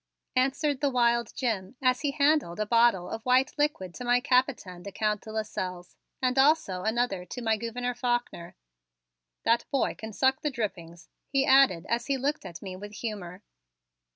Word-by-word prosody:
answered 270 +2 +1
the 285 - +2
wild 235 -2 +2
Jim 225 -4 -2
as 255 -1 +2
he 290 - 0
handed 280 - +2
a 215 - -1
bottle 230 -5 +3
of 225 - -5
white 255 +2 +3
liquid 240 - 0
to 250 - -7
my 245 0 +3
Capitaine, 250 -8 0
the 200 - -8
Count 210 +1 -1
de 220 - -10
Lasselles, 185 -5 -4 0.3
and 255 +1 +2
also 275 - +3
another 220 -3 0
to 215 - -8
my 225 -2 +1
Gouverneur 240 +3 -3
Faulkner. 240 -8 -2 0.9
"That 230 +1 +2
boy 275 - +1
can 220 0 -8
suck 265 +5 +1
the 300 - 0
drippings," 175 - -5 0.2
he 270 -1 +1
added 265 - +5
as 235 +1 -1
he 275 -1 +1
looked 285 +4 -2
at 170 +2 -10
me 190 -2 -6
with 205 +2 -9
humor. 200 -4 -6
235 Hz, 175 wpm, -28 LUFS, 200-265 Hz, 0.9 s, added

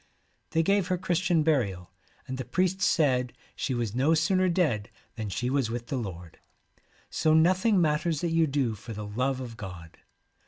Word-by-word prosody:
They 165 - +1
gave 195 +1 +2
her 185 -1 0
Christian 175 -2 +1
burial, 100 - 0 0.4
and 130 0 -5
the - - -2
priest 185 +9 0
said 130 -8 +2 0.2
she 130 - -2
was 115 -4 -2
no 140 +7 +3
sooner 185 +4 +2
dead 150 - 0 0.3
than 110 -3 -4
she 125 +5 -2
was 130 -3 +1
with 120 0 -5
the 135 - -1
Lord. 90 -7 -7 0.7
So 155 0 +2
nothing 185 +5 +4
matters 155 -1 +1
that 170 - -1
you 165 -1 +3
do 135 -5 0
for 110 +2 -9
the 105 0 -6
love 130 +6 -1
of 120 -3 -7
God.' 90 -6 -9
135 Hz, 180 wpm, -28 LUFS, 115-165 Hz, 0.7 s, nothing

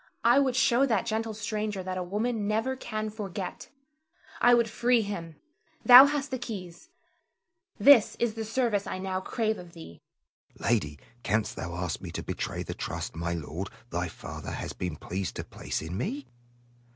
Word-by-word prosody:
I 240 +4 +6
would 265 -3 +2
show 265 0 +4
that 225 -4 +1
gentle 220 -1 -2
stranger 210 -2 -3
that 185 0 -4
a 185 - -2
woman 210 +4 -1
never 225 +5 0
can 215 -4 -4
forget. 195 -3 -6 0.7
I 245 0 +7
would 235 -1 +3
free 240 +1 +2
him. 170 -6 -5 0.5
Thou 255 +2 +11
hast 285 -1 -2
the 260 - -2
keys. 210 - -7 0.9
This 275 -6 +7
is 235 -2 0
the 225 0 -4
service 220 -2 0
I - - -3
now 185 0 -3
crave 220 +2 -1
of 175 -1 -12
thee. 160 - -12 0.6
Selim. 120 - +1
Lady, 75 -10 -1 0.2
canst 105 0 0
thou 85 -1 -5
ask 90 -2 -3
me - - -6
to - - -4
betray - - -3
the - - -5
trust - - -5
my 85 +1 -2
lord, 85 +4 -5 0.2
thy - - -1
father, - - -8
hath - - -6
been 90 -4 -2
pleased 95 +5 -4
to - - -4
place - - -5
in 80 +3 -5
me? 275 +9 -3
210 Hz, 175 wpm, -28 LUFS, 170-240 Hz, 0.9 s, Thou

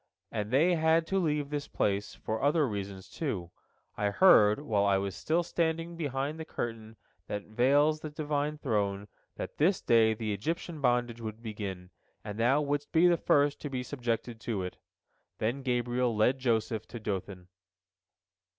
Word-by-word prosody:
And 105 -2 -3
they 155 +9 +4
had 160 0 +3
to 195 - +3
leave 150 -4 0
this 145 -1 -3
place 100 0 -1
for 110 0 -4
other 145 +1 +3
reasons, 100 -3 -5
too. 100 - -4 0.4
I 105 -1 0
heard, 105 - +6
while 110 -9 0
I 100 -1 +3
was 95 -1 -3
still 170 +2 0
standing 165 0 -1
behind 145 -1 -3
the - - -3
curtain 115 -6 -5 0.3
that 105 0 -3
veils 140 +7 +3
the 155 - -6
Divine 150 0 -2
throne, 105 -7 -1 0.3
that - - -6
this 175 +5 +3
day 110 -1 +4
the 110 -1 -2
Egyptian 160 - -3
bondage 120 -2 +1
would 110 +1 -6
begin, 100 -5 -6 0.3
and 105 0 -6
thou 130 +6 +3
wouldst 145 0 -2
be 165 +2 +5
the 175 - +5
first 145 -2 +2
to 145 - -4
be 130 -2 -3
subjected 120 -3 -3
to 105 -6 -2
it." 90 - -6 0.6
Then 120 +6 -1
Gabriel 125 -1 0
led 125 +5 +3
Joseph 115 -3 0
to 120 - -7
Dothan. 95 -3 -5
120 Hz, 165 wpm, -30 LUFS, 105-150 Hz, 0.6 s, heard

